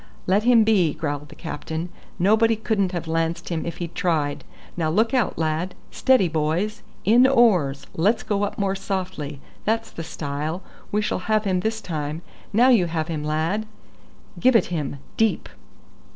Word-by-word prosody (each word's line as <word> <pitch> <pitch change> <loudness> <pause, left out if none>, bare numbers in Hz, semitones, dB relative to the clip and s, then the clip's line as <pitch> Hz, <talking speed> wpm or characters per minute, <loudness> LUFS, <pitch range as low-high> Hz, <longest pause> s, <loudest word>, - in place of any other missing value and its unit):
"Let 195 +3 +3
him 240 -2 +6
be," 190 -8 +3
growled 145 -1 -4
the - - -12
captain; 160 +1 -5 0.3
"nobody 220 +5 +4
couldn't 210 -4 0
have 175 -3 -4
lanced 165 +1 -1
him 170 -2 -2
if 170 0 -5
he'd 170 -1 -5
tried. 155 -5 0 0.3
Now 160 -3 0
look 220 +8 +2
out, 250 -6 +1
lad! 160 +3 -1 0.2
Steady, 260 -8 +3
boys! 165 +7 -1 0.2
In 240 +5 +6
oars! 195 - +3
Let's 205 +8 +2
go 205 -2 -1
up 205 - -2
more 195 -1 0
softly. 185 -7 -4 0.2
That's 225 +1 -1
the 165 - -6
style. 155 +3 -4 0.3
We 210 +1 +1
shall - - -1
have 215 -1 +3
him 190 -3 +1
this 220 +3 -2
time. 155 -2 -4 0.3
Now 240 +5 +5
you 210 -9 +5
have 160 0 -2
him, 155 -2 -3
lad; 160 +8 -1 0.7
give 255 0 +4
it 230 - +5
him 145 -4 -2 0.2
deep." 225 -1 +1
180 Hz, 165 wpm, -23 LUFS, 160-215 Hz, 0.7 s, him